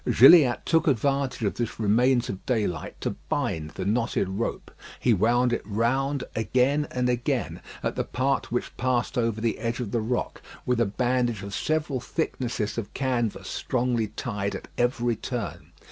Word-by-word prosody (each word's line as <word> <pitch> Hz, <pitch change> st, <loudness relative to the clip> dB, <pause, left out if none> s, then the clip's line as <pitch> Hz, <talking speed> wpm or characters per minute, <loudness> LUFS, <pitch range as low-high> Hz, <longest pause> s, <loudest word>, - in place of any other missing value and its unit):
Gilliatt 135 Hz, -2 st, +7 dB
took 165 Hz, -1 st, +2 dB
advantage 135 Hz, -1 st, +1 dB
of 100 Hz, -4 st, +1 dB
this 115 Hz, +3 st, -4 dB
remains 120 Hz, +4 st, +3 dB
of 95 Hz, -, -5 dB
daylight 105 Hz, -9 st, -1 dB
to -, -, -1 dB, 0.2 s
bind 80 Hz, -1 st, -1 dB
the 95 Hz, -, -4 dB
knotted 115 Hz, -1 st, +1 dB
rope. 100 Hz, +5 st, -3 dB, 0.3 s
He 120 Hz, -, +3 dB
wound 120 Hz, +5 st, +3 dB
it -, -, 0 dB
round 130 Hz, +6 st, 0 dB
again 130 Hz, +6 st, +2 dB
and 125 Hz, 0 st, 0 dB
again 125 Hz, -1 st, -1 dB, 0.2 s
at -, -, -1 dB
the -, -, 0 dB
part 135 Hz, +3 st, -1 dB
which 120 Hz, -, -2 dB
passed 125 Hz, -1 st, 0 dB
over 115 Hz, -2 st, 0 dB
the 115 Hz, 0 st, -1 dB
edge 115 Hz, +1 st, -2 dB
of 115 Hz, -5 st, -3 dB
the 115 Hz, -, 0 dB
rock, 120 Hz, +3 st, -2 dB, 0.2 s
with 125 Hz, -1 st, +1 dB
a 115 Hz, -, +3 dB
bandage 120 Hz, 0 st, 0 dB
of 100 Hz, 0 st, -7 dB
several 155 Hz, +1 st, 0 dB
thicknesses 120 Hz, -5 st, -2 dB
of 105 Hz, -, -8 dB
canvas 125 Hz, -5 st, -1 dB
strongly 120 Hz, -3 st, 0 dB
tied 100 Hz, -2 st, -3 dB
at -, -, -8 dB
every 120 Hz, -1 st, +1 dB
turn. 115 Hz, -, -5 dB
120 Hz, 165 wpm, -26 LUFS, 110-130 Hz, 0.3 s, Gilliatt